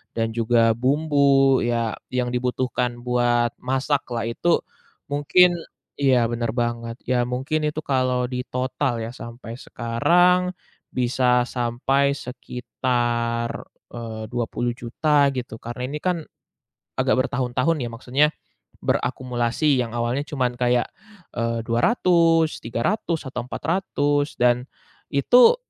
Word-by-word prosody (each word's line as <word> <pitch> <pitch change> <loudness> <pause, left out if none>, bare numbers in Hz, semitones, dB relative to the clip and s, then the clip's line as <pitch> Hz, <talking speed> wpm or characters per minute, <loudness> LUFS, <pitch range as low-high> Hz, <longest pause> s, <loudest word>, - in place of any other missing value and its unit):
dan 115 -1 +1
juga 115 0 +3
bumbu 140 0 +3
ya, 115 -2 -1 0.2
yang 125 -1 0
dibutuhkan 125 0 -1
buat 120 -1 +2
masaklah. 130 -2 -1
Itu 170 +8 +1 0.5
mungkin 175 +5 +4 0.4
iya, 130 -4 +4
bener 115 -1 -1
banget. 120 -1 -2
Ya 125 -1 +1
mungkin 140 +5 -1
itu 150 +1 -3
kalau 130 -2 +1
ditotal 125 -1 -2
ya 115 - -5
sampai 115 -1 -9
sekarang 180 +10 +2 0.4
bisa 125 0 +2
sampai 135 +3 +1
sekitar, 120 -2 -2 0.2
eee, 110 -2 -6
Rp20.000.000 120 +5 0
gitu. 125 -3 -6
Karena 120 +2 -7
ini 150 - -4
kan 175 -2 -1 0.7
agak - - +2
bertahun-tahun 125 +6 0
ya, - - -3
maksudnya 130 +5 +2 0.6
berakumulasi. 125 +2 0
Yang 115 -2 -2
awalnya 120 +4 0
cuman 130 -4 0
kayak, 125 0 +2 0.5
eee, 115 -1 -1
Rp200.000, 165 - +3
Rp300.000, 155 - -2
atau 125 -2 -4
Rp400.000. 145 -5 -1
Dan 125 +1 +2 0.4
itu 250 - +6
125 Hz, 105 wpm, -23 LUFS, 120-145 Hz, 0.7 s, itu